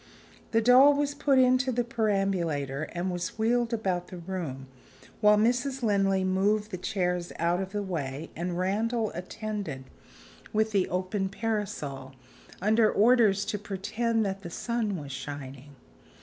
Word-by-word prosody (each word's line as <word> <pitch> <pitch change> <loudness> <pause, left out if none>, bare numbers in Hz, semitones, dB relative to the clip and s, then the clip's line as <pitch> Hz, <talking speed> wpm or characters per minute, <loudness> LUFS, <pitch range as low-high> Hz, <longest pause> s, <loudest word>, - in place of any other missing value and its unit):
The 225 - +2
doll 260 +4 +7
was 285 0 0
put 285 -2 +2
into 255 +1 +4
the 245 0 0
perambulator, 185 - -1
and 175 +2 -2
was 175 +2 -4
wheeled 235 +2 +1
about 185 -6 -1
the 185 - -9
room, 170 -7 -5 0.5
while 210 -1 +5
Mrs. 245 +4 +1
Linley 195 -3 +2
moved 205 +3 +1
the 185 - -3
chairs 180 -3 -1
out 170 +2 +1
of 190 0 -5
the 205 0 -2
way, 155 -5 -4
and 175 +1 -3
Randal 215 +4 0
attended 195 -6 -5 0.7
with 220 +1 +1
the 195 -3 +1
open 190 +2 -1
parasol 185 - -4 0.5
under 215 +1 +4
orders 215 -3 +4
to 210 - -3
"pretend 215 +3 -1
that 195 0 -3
the 175 - -7
sun 220 +1 -2
was 145 -3 -7
shining." 140 0 -8
195 Hz, 145 wpm, -28 LUFS, 175-225 Hz, 0.7 s, doll